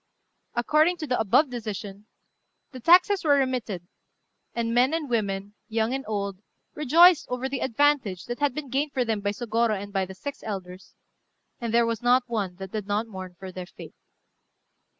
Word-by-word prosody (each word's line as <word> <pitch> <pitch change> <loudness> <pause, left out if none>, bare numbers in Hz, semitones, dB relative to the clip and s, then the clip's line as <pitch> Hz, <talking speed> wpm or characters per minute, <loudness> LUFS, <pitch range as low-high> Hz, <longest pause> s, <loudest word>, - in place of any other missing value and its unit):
] - - -49
According 305 +8 +3
to 320 - -4
the 255 -4 0
above 235 +6 +3
decision, 210 -3 -6 0.6
the 260 - -9
taxes 360 - +5
were 290 -3 +4
remitted; 240 -10 -2 0.7
and 230 -1 -1
men 255 +6 +3
and 320 -3 -3
women, 200 -4 -2
young 225 +2 0
and 270 0 -2
old, 200 -3 -3 0.3
rejoiced 325 +4 +5
over 250 +1 -2
the 265 0 -3
advantage 260 -7 +1
that 240 +2 -5
had 290 -3 +1
been 285 -4 -6
gained 280 +2 0
for 255 -2 +1
them 220 -2 0
by 200 - 0
Sôgorô 225 0 0
and 200 0 -8
by 195 -1 +1
the 190 - -9
six 285 +8 -7
elders, 185 -3 -7 0.6
and 235 -3 -3
there 235 +1 +4
was 230 0 -2
not 245 +1 +4
one 210 -7 -3
that 190 0 -8
did 210 -2 -4
not 210 +2 0
mourn 185 -4 -9
for 190 0 -8
their 180 -1 -7
fate. - - -12
230 Hz, 185 wpm, -26 LUFS, 200-270 Hz, 0.7 s, taxes